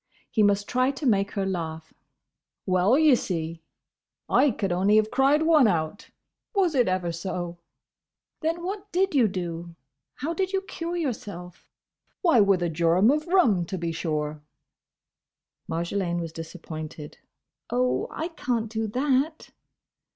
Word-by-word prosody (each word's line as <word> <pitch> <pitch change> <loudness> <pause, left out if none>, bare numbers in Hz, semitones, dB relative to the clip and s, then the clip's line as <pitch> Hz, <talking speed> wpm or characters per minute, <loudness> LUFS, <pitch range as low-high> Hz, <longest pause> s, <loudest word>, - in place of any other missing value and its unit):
He 220 - +2
must 205 0 +3
try 255 +1 +2
to 280 +2 -4
make 200 -4 +2
her 195 -2 -1
laugh. 160 -4 -4 0.7
"Well, 185 +6 +3
ye 310 -2 +6
see, 165 -7 -2 0.7
I 290 - +4
could 205 -5 -2
only 190 +4 +3
have 215 0 +3
cried 280 +3 +3
one 315 -6 +5
out, 165 0 -2 0.5
was 370 -5 +3
it 250 -4 +3
ever 185 -2 0
so!" 175 0 -5 0.8
"Then 330 +2 -1
what 400 +2 -5
did 380 +1 +1
you 255 -6 +4
do? 170 -3 -5 0.4
How 310 +5 -3
did 380 +3 -2
you 385 - +1
cure 345 -3 -5
yourself?" 205 - -5 0.5
"Why, 330 -10 +5
with 195 -3 +3
a 170 - 0
jorum 170 +7 +4
of 305 +2 -1
rum, 325 - +4
to 190 - -4
be 170 -1 -2
sure!" 155 -2 -3 1.3
Marjolaine 170 +1 -1
was 165 -1 -4
disappointed. 160 -2 -8 0.5
"Oh!—I 125 - -1
can't 235 -9 -2
do 220 -1 -2
that!" 275 +6 0
200 Hz, 140 wpm, -26 LUFS, 170-285 Hz, 1.3 s, ye